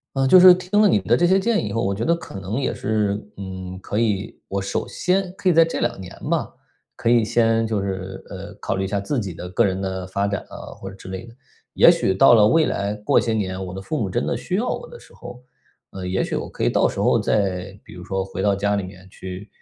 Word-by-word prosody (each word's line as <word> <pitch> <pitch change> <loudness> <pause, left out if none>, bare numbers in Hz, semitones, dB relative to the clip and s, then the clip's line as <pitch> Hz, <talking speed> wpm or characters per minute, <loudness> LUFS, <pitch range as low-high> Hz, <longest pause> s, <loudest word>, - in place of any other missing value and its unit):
呃， 135 0 +2
就 180 +7 +8
是 180 0 +10
听 185 +3 0
了 215 - +6
你 - - +3
们 95 - -9
的 115 +4 +4
这 175 - +3
些 190 +2 +4
建 225 +3 +1
议 105 - -3
以 - - -6
后， 115 +2 -1
我 100 0 0
觉 105 - -3
得 170 - +3
可 100 -11 -9
能 95 +6 -3
也 140 - -1
是， 105 -2 0 0.2
嗯， 95 -1 -7
可 105 - -3
以 105 -3 -1
我 100 - -2
首 100 - -3
先， 185 0 0
可 190 - -1
以 - - +4
在 165 0 +6
这 165 - -3
2 - - -1
年 90 - -8 0.2
吧， - - 0 0.5
可 115 - 0
以 120 -1 +5
先， 115 0 +2
就 110 -3 -1
是， 95 -1 -5
呃 100 +1 -8
考 105 - -3
虑 95 - -1
一 - - -1
下 100 +1 -1
自 125 +7 -2
己 95 -5 -5
的 90 +2 -8
个 95 - +2
人 95 0 -2
的 95 -1 -4
发 100 +2 -1
展 100 -1 -2
啊， - - -10
或 95 - -6
者 95 - -11
之 95 - -12
类 95 +5 -6
的。 115 - -14 0.4
也 - - +7
许 95 - +1
到 95 - +6
了 105 -2 +6
未 160 +6 +4
来， 100 +1 -2
过 105 0 +2
些 115 - -1
年， 95 -3 -2
我 90 - -7
的 95 - -6
父 150 +9 -3
母 100 - -1
真 120 +6 -1
的 - - 0
需 185 - -3
要 230 +5 -1
我 - - -4
的 480 - -11
时 - - -18
候， 125 0 -11 0.5
嗯 95 -1 -6
也 95 - 0
许 - - -4
我 - - -3
可 - - -4
以 - - +3
到 - - +3
时 - - -7
候， - - +3
再 95 -2 -1
比 - - -14
如 90 - -10
说 95 +1 -2
回 95 - -6
到 100 0 +3
家 100 +1 0
里 100 - -1
面， 95 0 -11
去 95 +2 -8
100 Hz, 295 characters per minute, -22 LUFS, 95-120 Hz, 0.5 s, 是